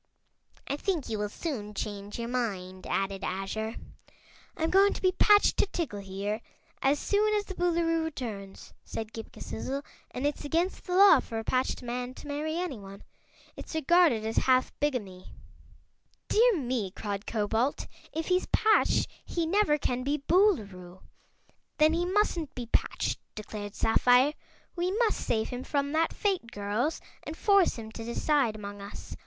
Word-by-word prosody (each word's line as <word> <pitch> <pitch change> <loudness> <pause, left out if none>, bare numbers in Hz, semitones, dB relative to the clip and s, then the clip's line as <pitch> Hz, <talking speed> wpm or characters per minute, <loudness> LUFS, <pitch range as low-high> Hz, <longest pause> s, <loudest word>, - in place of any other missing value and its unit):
"I 280 - -2
think 340 -4 -1
you 215 -2 -2
will 210 0 -1
soon 210 -6 -5
change 205 0 -5
your 235 0 -3
mind," 195 -7 -3
added 195 0 -1
Azure. 205 +4 -3 0.8
"I'm 320 0 0
going 395 +2 +5
to - - -6
be 370 - +5
patched 410 +2 +5
to - - +3
Tiggle, 295 - -3
here, 200 +3 -3 0.4
as 275 +2 +3
soon 425 +6 +2
as 410 -1 0
the 385 - -6
Boolooroo 335 -2 +1
returns," 220 -10 -6
said 220 0 -6
Ghip 225 -1 -8
Ghisizzle, 275 +5 -5 0.3
"and 255 - -4
it's 290 +1 -1
against 335 +5 -1
the 360 - -2
law 395 +1 +8
for 225 - -5
a 225 - -2
patched 255 +2 0
man 245 +1 -4
to - - -11
marry 305 +3 -2
anyone. 210 - -5 0.5
It's - - -8
regarded 315 -7 +4
as 225 - -3
half 255 -1 +3
bigamy." 210 -11 -3 0.9
"Dear 460 -2 +5
me!" 245 -8 -1
cried 200 +1 -5
Cobalt; 225 +5 0 0.3
"if 320 +1 -3
he's 365 0 +2
patched 435 0 +3 0.2
he 340 -2 -2
never 330 -3 +3
can 250 -3 -1
be 285 +3 0
Boolooroo." 200 - +1 0.7
"Then 310 +1 +5
he 345 +1 +1
mustn't 360 -6 0
be 245 - -4
patched," 230 - -1 0.2
declared 210 -1 -7
Sapphire. 250 +5 +4 0.4
"We 355 +1 0
must 460 -3 +2
save 220 -1 0
him 250 +1 -5
from 280 0 -1
that 320 +1 +2
fate, 380 - -1
girls, 210 +8 -1 0.2
and 315 - -7
force 400 -3 +4
him 220 -1 -7
to 225 - -7
decide 235 0 +1
among 205 -1 -7
us. 200 +1 -8
255 Hz, 160 wpm, -29 LUFS, 215-335 Hz, 0.9 s, law